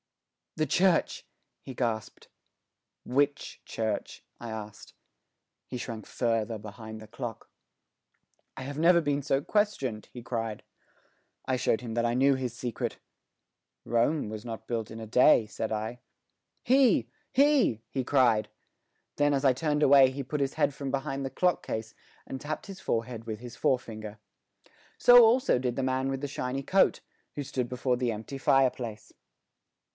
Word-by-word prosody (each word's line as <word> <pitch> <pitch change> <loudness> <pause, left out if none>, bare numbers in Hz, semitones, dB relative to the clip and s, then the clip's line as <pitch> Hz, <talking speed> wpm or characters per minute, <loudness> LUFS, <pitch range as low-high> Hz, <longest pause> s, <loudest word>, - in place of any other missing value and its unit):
"The 155 - +1
church," 175 +4 +2 0.4
he 130 - -8
gasped. 115 -4 -3 0.8
"Which 145 +3 0
church?" 110 -2 -3 0.2
I 120 - -7
asked. 110 -1 -8 0.7
He 125 - -5
shrank 115 -3 -6
farther 115 -2 -1
behind 110 +1 -9
the 110 - -11
clock. 115 0 -7 1.1
"I 135 - -5
have 140 +2 -6
never 170 +2 +6
been 145 -3 0
so 135 -1 +1
questioned," 140 - -1
he 125 - -9
cried. 115 -3 -4 0.8
I 130 - 0
showed 115 -2 +1
him 120 -3 -6
that 120 +1 0
I 120 0 +1
knew 135 +2 +4
his 130 -3 -3
secret, 120 -3 -3 0.9
"Rome 120 +4 +1
was 110 0 -6
not 115 -2 -7
built 115 -3 -3
in 110 - -7
a 110 - -6
day," 125 +1 +5
said 110 +2 -5
I. 110 +3 -3 0.6
"He! 250 - +4 0.2
He!" 270 - +3
he 130 - -2
cried. 120 -5 +3 0.7
Then, 145 0 +3
as 140 0 0
I 130 - +6
turned 150 +2 0
away, 135 -2 +7
he 135 +2 -5
put 145 +3 -3
his 135 0 -1
head - - +2
from 140 -1 -5
behind 135 0 -2
the 135 - -2
clock 180 +6 0
case 110 0 -4 0.3
and 135 - -7
tapped 155 +1 -4
his 195 -1 -9
forehead 115 0 -2
with 110 -2 -5
his 120 0 -9
forefinger. 110 -4 -2 0.8
So 245 -1 +8
also 240 - +4
did 125 -1 -2
the 135 - 0
man 130 +1 0
with 135 0 -2
the 145 - -2
shiny 135 0 -3
coat, 195 +7 +3 0.3
who 145 - -3
stood 130 -3 -3
before 125 0 0
the 125 -1 0
empty 115 +6 -6
fireplace. 125 -6 +1
125 Hz, 160 wpm, -29 LUFS, 115-140 Hz, 1.1 s, So